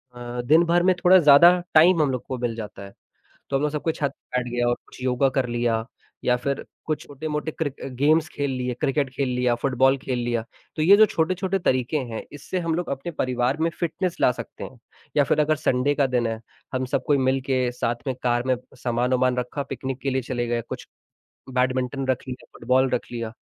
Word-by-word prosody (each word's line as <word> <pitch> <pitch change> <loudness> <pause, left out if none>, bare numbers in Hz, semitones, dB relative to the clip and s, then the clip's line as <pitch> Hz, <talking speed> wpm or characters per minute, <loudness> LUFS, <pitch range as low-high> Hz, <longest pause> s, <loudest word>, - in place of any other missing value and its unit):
अ, 120 0 -5
दिन 155 +7 +5
भर 175 +1 +3
में 185 0 +4
थोड़ा 185 +1 +8
ज़्यादा 170 +2 +7
टाइम 165 +2 +6
हम 145 -3 +2
लोग 125 -2 -4
को 130 - -3
मिल 120 -2 -2
जाता 105 -3 -7
है, 100 0 -11 0.6
तो 140 - -1
हम - - -3
लोग 150 - +1
सब 150 -1 -3
कोई 160 - 0
छत 140 -3 -1
पे 125 - -6
बैठ 125 -1 -5
गया 120 0 0
और 120 - +2
कुछ - - -14
योगा 130 +1 +2
कर 130 - 0
लिया 120 -1 0 0.4
या 125 - +3
फिर 140 +2 -3 0.2
कुछ 155 -1 -2
छोटे-मोटे 150 +2 -4
क्रिक 145 -4 -3 0.2
गेम्स 155 +4 +3
खेल 140 -1 -2
लिए, 125 -1 -2
क्रिकेट 140 0 +1
खेल 135 -1 0
लिया, 125 -1 +1
फुटबॉल 130 +2 +2
खेल 130 -2 -3
लिया, 120 -1 -1 0.3
तो 155 - -2
ये 185 +6 +7
जो 215 - +8
छोटे-छोटे 185 +2 -1
तरीके 130 -2 0
हैं, 120 -5 -4
इससे 165 +5 -4
हम 165 -2 -1
लोग 175 +1 -3
अपने 140 +5 -4
परिवार 130 -2 0
में 165 - +2
फिटनेस 175 +1 -2
ला - - +5
सकते - - -8
हैं 125 - -10 0.4
या 145 - +6
फिर - - +1
अगर 155 +1 +2
संडे 140 0 +1
का 140 -2 +2
दिन 125 -2 0
है, 115 0 -3 0.3
हम 130 0 -1
सब 130 +1 -1
कोई 145 - +4
मिल 130 0 +1
के 130 -2 +1
साथ 120 -1 -1
में 130 - -1
कार 120 -1 +1
में 130 - +3 0.3
सामान-वामान 125 +1 +1
रखा, 125 +3 -3
पिकनिक 130 0 -5
के 140 - -1
लिए 130 0 0
चले 120 -1 -3
गए, 120 0 0
कुछ - - -7 0.7
बैडमिंटन 130 +1 0
रख 130 0 -1
लिया, 125 - -7
फुटबॉल 130 +2 +2
रख 120 - -2
लिया, 115 -2 -4
130 Hz, 225 wpm, -24 LUFS, 125-150 Hz, 0.7 s, थोड़ा